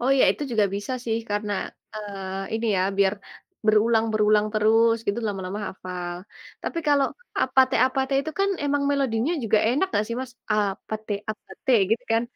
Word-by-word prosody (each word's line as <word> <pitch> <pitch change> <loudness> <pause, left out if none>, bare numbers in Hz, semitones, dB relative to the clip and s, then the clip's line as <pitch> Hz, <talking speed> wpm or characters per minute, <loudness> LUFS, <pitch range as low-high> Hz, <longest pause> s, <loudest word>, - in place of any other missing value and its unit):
Oh 255 +3 +1
ya, - - +6
itu - - -3
juga 215 -2 +3
bisa 205 +6 -4
sih, 225 -1 0
karena, 205 0 -1 0.4
eee, 195 -2 -5
ini 225 +1 -1
ya, 185 - +2 0.2
biar 195 0 +4 0.5
berulang-berulang 215 -1 +3
terus, 225 +2 +4
gitu 200 +3 0
lama-lama 195 0 -3
hafal. 180 -2 -6 0.5
Tapi 335 - -3
kalau 280 -2 +4 0.4
APT 260 0 +3
APT 265 +1 -1
itu 315 +3 -4
kan 395 - +3
memang 285 0 +1
melodinya 270 0 +1
juga 215 0 +3
enak 280 +11 +2
enggak 210 - 0
sih, 235 +1 -4
Mas? 260 -1 -7 0.2
Apateu, 210 +1 -2 0.2
apateu, 215 +4 -1
gitu 225 - +1
kan? 225 +1 +3
220 Hz, 160 wpm, -25 LUFS, 205-255 Hz, 0.5 s, ya